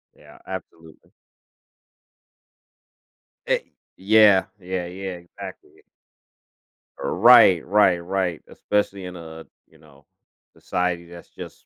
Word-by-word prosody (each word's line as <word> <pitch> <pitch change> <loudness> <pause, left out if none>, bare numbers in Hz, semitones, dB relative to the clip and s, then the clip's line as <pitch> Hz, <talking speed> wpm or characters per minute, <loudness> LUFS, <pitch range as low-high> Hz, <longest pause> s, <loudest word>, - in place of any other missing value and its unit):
Yeah - - -18
absolutely. 80 -1 -11 2.4
E - - +1 0.4
yeah, 105 -1 +5
yeah, 90 -1 -4
yeah, 95 +1 -7
exactly. 85 - -12 1.2
Right, 90 -4 +5
right, 95 -3 +3
right 90 -2 -2
especially 100 -2 -2
in 90 0 -8
a, 80 -1 -11 0.2
you 80 - -24
know, 75 -2 -22 0.5
society 90 -1 -3
that's 85 0 -14
just - - -12
90 Hz, 95 wpm, -22 LUFS, 85-95 Hz, 2.4 s, yeah